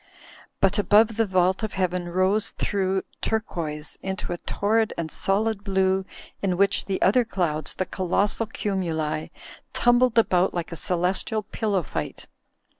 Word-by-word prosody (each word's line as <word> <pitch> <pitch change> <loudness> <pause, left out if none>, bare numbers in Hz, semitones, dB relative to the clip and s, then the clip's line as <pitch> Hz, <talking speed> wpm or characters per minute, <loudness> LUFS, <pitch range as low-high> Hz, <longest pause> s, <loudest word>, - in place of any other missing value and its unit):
But 195 +2 +3
above 215 +2 +4
the 225 -1 +1
vault 185 +1 +2
of 220 -2 -3
Heaven 180 -2 -1
rose 185 +4 +1
through 190 -1 0 0.2
turquoise 165 -9 -3
into 190 -2 -3
a - - -4
torrid 220 +2 0
and 160 -2 -3
solid 205 +1 0
blue 190 -1 +1 0.4
in 185 -3 0
which 200 +1 +3
the 195 -1 -2
other 230 +6 +5
clouds, 170 -8 -2
the 185 - -1
colossal 200 +5 0
cumuli, 165 -8 -2 0.4
tumbled 240 0 +3
about 185 -5 +3
like 170 -1 -3
a - - -4
celestial 185 +6 -1
pillow 205 -3 -1
fight. - - -5
190 Hz, 140 wpm, -25 LUFS, 180-210 Hz, 0.4 s, other